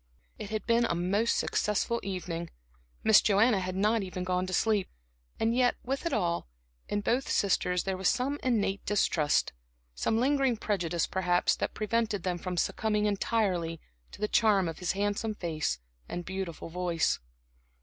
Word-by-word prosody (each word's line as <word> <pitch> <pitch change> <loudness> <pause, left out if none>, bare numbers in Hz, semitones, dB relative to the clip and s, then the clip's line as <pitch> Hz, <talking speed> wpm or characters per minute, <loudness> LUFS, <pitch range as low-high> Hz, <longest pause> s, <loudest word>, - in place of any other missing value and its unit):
It 210 -2 -6
had 215 0 -3
been 235 0 +3
a - - 0
most 195 +6 +1
successful 210 +3 0
evening, 175 -3 -4 0.5
Miss 220 -1 +7
Joanna 210 +1 +4
had 185 0 -3
not 210 +3 +2
even 185 -1 -4
gone 180 0 0
to - - -5
sleep. 210 -1 +1 0.5
And 230 +1 +1
yet, 250 -1 +3
with 270 +6 -2
it - - -2
all, 170 - 0 0.4
in 205 - 0
both 245 +5 0
sisters 180 -2 +1
there 190 -1 -1
was 190 0 +2
some 265 +4 0
innate 205 -6 0
distrust, 165 -7 +1 0.4
some 220 - 0
lingering 265 -1 +2
prejudice 175 -6 -1
perhaps, 180 -1 +1
that - - -3
prevented 215 -2 0
them 180 -2 -1
from 180 0 -4
succumbing 210 +3 0
entirely 190 -5 0 0.3
to - - -12
the 210 - 0
charm 210 -5 +3
of 165 - -5
his 180 - 0
handsome 205 +2 -1
face 155 - -2 0.3
and 175 0 -4
beautiful 190 -4 -5
voice. 175 -1 0
200 Hz, 160 wpm, -29 LUFS, 180-220 Hz, 0.5 s, Miss